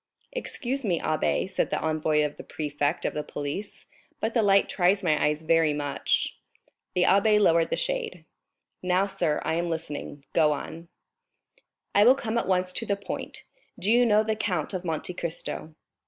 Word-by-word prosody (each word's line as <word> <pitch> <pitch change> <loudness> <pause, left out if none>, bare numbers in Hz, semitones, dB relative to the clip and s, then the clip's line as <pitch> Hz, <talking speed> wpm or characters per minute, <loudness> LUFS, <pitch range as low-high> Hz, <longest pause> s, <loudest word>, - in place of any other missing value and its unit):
"Excuse 275 - -3
me, 180 -7 +1
abbé," 140 - 0
said - - -1
the - - -1
envoy 155 -1 +1
of 150 - -5
the - - -8
prefect 145 0 -2
of - - 0
the 150 - -2
police, 145 +8 -5 0.3
"but 225 +1 -1
the 235 - +3
light 200 -1 +4
tries 190 +2 +2
my 155 -4 +2
eyes 150 +1 +1
very 165 -1 +3
much." 145 -1 -1 0.6
The 180 - +3
abbé 210 +3 +4
lowered 165 -5 +4
the - - 0
shade. - - -3 0.6
"Now, 185 +1 +2
sir, 180 -6 -1
I - - 0
am 170 +1 -1
listening—go 150 -1 -1
on." 165 +3 -7 1.1
"I 205 - +6
will 250 +4 +7
come 235 -3 -1
at - - -3
once 185 -1 +1
to 230 - -2
the 200 - +1
point. 200 - -6 0.3
Do 205 - 0
you 240 +1 +5
know 215 0 +4
the 220 0 -1
Count 190 -6 -1
of 185 -1 -3
Monte 165 +1 -2
Cristo?" 160 -2 -5
175 Hz, 175 wpm, -27 LUFS, 155-210 Hz, 1.1 s, will